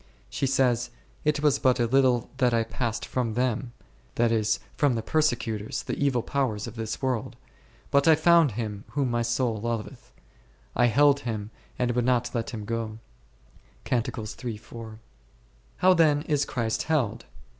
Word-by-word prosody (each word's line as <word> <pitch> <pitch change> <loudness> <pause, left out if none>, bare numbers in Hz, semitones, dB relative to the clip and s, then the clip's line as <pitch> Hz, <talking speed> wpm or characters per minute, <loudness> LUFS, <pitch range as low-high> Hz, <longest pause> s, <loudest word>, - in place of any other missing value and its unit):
She 135 - -1
says, 125 -3 +2 0.3
It 150 -1 +1
was 150 -3 +3
bat 130 -1 +3
a 120 - +3
little 125 -1 +2
that 125 -3 +3
I 115 - +2
passed 115 +1 -3
from 120 -4 -2
them 125 0 -1 0.4
(that 120 -1 +2
is, 110 -2 +1 0.2
from 140 -4 +2
the 115 - -2
persecutors, 115 -7 -1
the - - -4
evil 130 -5 +1
powers 130 -7 -1
of 115 - -8
this 110 +2 -5
world), 125 -4 -1 0.6
but 140 +2 +3
I 160 - +8
found 165 -4 +4
Him 105 -2 -4
whom 140 -4 0
my 120 0 +1
soul 120 -1 0
loveth; 115 +3 -5 0.6
I 120 - +4
held 140 +4 +4
Him 110 -5 -4 0.3
and 125 -1 +1
would 120 0 0
not 125 -2 +1
let 115 -2 -2
Him 110 -3 -6
go 115 -1 -3 0.9
k. 125 - +1 1.8
How 185 0 +5
then 155 -4 +3
is 145 -3 +1
Christ 115 -3 -1
held 145 -9 -1
120 Hz, 155 wpm, -26 LUFS, 115-140 Hz, 1.8 s, I